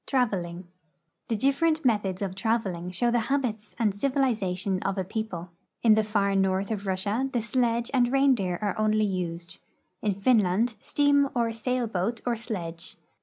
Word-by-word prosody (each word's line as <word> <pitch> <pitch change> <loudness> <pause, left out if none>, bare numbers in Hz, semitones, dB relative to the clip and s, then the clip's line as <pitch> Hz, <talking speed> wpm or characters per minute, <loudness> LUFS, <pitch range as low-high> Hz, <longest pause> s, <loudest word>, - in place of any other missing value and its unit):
TRAVELING. 185 -9 -1 0.6
The 230 - 0
different 280 +6 +1
methods 205 -5 +1
of 190 -2 -3
traveling 195 -4 -1
show 235 +6 0
the 240 - +3
habits 235 -7 -1
and 215 -4 +1
civiliza 230 -5 0
tion 190 -1 -1
of 195 0 -2
a 190 - 0
people. 185 -4 -5 0.3
In 225 -2 +7
the 220 0 +3
far 205 -2 +1
north 195 +1 +1
of 205 -2 -3
Russia 205 +8 0
the 245 - 0
sledge 235 +1 0
and 250 -2 +4
tlie - - -4
reindeer 255 -10 +2
are 205 - 0
only 215 0 +2
used; 170 -3 -4 0.4
in 205 -3 0
Finland, 215 +1 +2
steam 285 +1 +2
or 235 -1 +1
sail 245 +2 -1
lioat 215 +3 -2
or 240 -1 +1
sledge. 175 -7 -6
215 Hz, 170 wpm, -27 LUFS, 190-240 Hz, 0.6 s, In